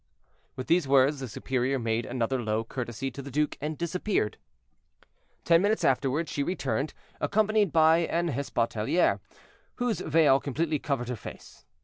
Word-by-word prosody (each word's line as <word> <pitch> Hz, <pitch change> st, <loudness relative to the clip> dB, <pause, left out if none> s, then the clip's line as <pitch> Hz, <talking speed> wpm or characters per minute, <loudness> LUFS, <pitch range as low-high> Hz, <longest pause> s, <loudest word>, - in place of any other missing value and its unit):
With 130 Hz, -, -5 dB
these 170 Hz, -3 st, +2 dB
words 140 Hz, +1 st, +4 dB
the 130 Hz, -, -5 dB
superior 130 Hz, +3 st, -1 dB
made 115 Hz, -1 st, -1 dB
another 125 Hz, +1 st, -1 dB
low 110 Hz, 0 st, -1 dB
courtesy 125 Hz, +2 st, -5 dB
to 140 Hz, -, -7 dB
the 140 Hz, -, -8 dB
duke 150 Hz, +3 st, 0 dB
and 150 Hz, +1 st, -3 dB
disappeared. 170 Hz, -, -1 dB, 1.1 s
Ten 170 Hz, 0 st, +5 dB
minutes 210 Hz, +3 st, +1 dB
afterward 135 Hz, +4 st, +1 dB
she 145 Hz, -, -3 dB
returned, 140 Hz, -4 st, -2 dB, 0.2 s
accompanied 215 Hz, -2 st, +2 dB
by 160 Hz, 0 st, +5 dB
an 170 Hz, 0 st, 0 dB
hospitaliere, 115 Hz, +1 st, 0 dB, 0.6 s
whose 245 Hz, -4 st, -1 dB
veil 150 Hz, -3 st, +4 dB
completely 150 Hz, +2 st, -1 dB
covered 135 Hz, -4 st, -2 dB
her 125 Hz, -, -2 dB
face. 110 Hz, -, -11 dB
140 Hz, 145 wpm, -28 LUFS, 125-165 Hz, 1.1 s, Ten